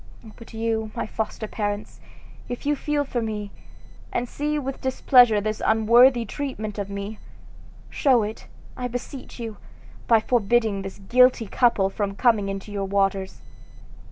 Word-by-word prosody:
But 230 - -13
you, 225 -1 -2
my - - -2
foster 220 0 -4
parents, 205 -1 -4 0.5
if 245 +2 -6
you 295 +1 +2
feel 290 +1 -1
for 245 -3 -2
me, 210 -2 -4 0.6
and 245 - -1
see 300 +4 -2
with 270 -2 -4
displeasure 250 -4 +5
this 215 +1 -3
unworthy 235 +3 +5
treatment 215 -5 -5
of 200 -1 -4
me, 200 +2 -6 0.7
show 255 -6 +3
it, 215 +1 -6 0.3
I 250 - -3
beseech 245 +2 -7
you, 225 -3 -6 0.5
by 230 -2 +6
forbidding 225 -2 +1
this 195 0 -7
guilty 250 +4 +4
couple 205 -3 +2
from 200 -1 -3
coming 215 -4 +2
into 195 +1 -6
your 200 -1 -2
waters." 195 -1 -1
225 Hz, 145 wpm, -24 LUFS, 205-245 Hz, 0.7 s, by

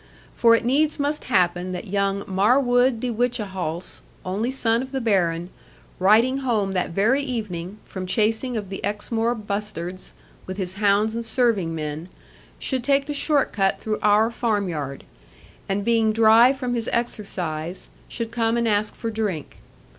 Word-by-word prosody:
For 230 -1 +5
it 230 - -1
needs 295 +5 +2
must 290 +1 -1
happen 180 -4 +1
that 180 - -5
young 200 0 0
Marwood 245 +5 +3
de 245 +1 -2
Whichehalse, 200 -8 -2 0.2
only 200 +6 -1
son 235 -3 +1
of 260 - -6
the 270 - -1
Baron, 175 -7 0 0.5
riding 225 +8 +4
home 220 -7 0
that 185 -1 -1
very 215 +11 +2
evening, 210 -8 -4
from 185 -1 -6
chasing 225 +4 0
of 205 -3 -5
the 195 - -6
Exmoor 225 +3 -1
bustards, 200 -4 -5 0.4
with 185 0 -5
his 185 -1 -4
hounds 210 +1 +2
and 230 0 -3
serving 225 -8 +1
men, 155 +2 -5 0.5
should 260 -3 -2
take 275 +1 +2
the 295 - -3
short 285 -1 +1
cut 195 -2 +1
through 215 -1 -2
our 210 +2 +4
farmyard, 185 - -2 0.7
and 200 +1 -1
being 225 -2 +3
dry 225 +3 +6
from 255 -3 -3
his 230 -2 -1
exercise, 180 -8 -3 0.2
should 230 -2 -5
come 230 0 +1
and 235 -1 +1
ask 210 0 0
for 230 - -4
drink. 205 -9 -3
215 Hz, 155 wpm, -23 LUFS, 190-240 Hz, 0.7 s, dry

